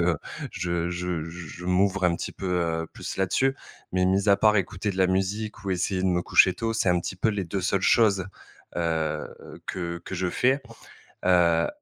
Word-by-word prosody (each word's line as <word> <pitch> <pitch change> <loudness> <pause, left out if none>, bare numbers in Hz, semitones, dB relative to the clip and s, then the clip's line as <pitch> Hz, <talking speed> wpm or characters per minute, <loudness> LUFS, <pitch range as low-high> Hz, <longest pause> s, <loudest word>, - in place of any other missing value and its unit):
que, - - +3
heu, 85 -1 +2 0.3
je 85 -1 -2
je 90 -2 -2
je 85 0 -8
je 90 +4 -9
m'ouvre 95 +2 +2
un 85 -1 +3
petit - - -5
peu, 95 - -6 0.4
heu, 80 - -6
plus - - -6
là-dessus. 95 +8 +1 0.4
Mais 90 0 +2
mis 95 +2 +2
à 100 - +6
part 105 -1 +4
écouter 95 +1 -1
de 95 - -6
la 95 -1 +4
musique 100 +3 -2
ou 100 - -2
essayer 95 +1 0
de 95 - +2
me 90 -1 +2
coucher 95 - +5
tôt, 115 +4 -2
c'est 110 -3 +1
un 90 0 +4
petit 90 - -5
peu 90 - +1
les 100 -3 -1
2 95 +3 -3
seules 95 +1 +1
choses, 100 -4 +4 0.5
heu, 80 -2 -1 0.4
que 85 -2 -3
que - - -6
je 90 0 -1
fais. 130 +7 +2 0.7
Heu, 85 -2 +4
95 Hz, 210 wpm, -26 LUFS, 85-100 Hz, 0.7 s, à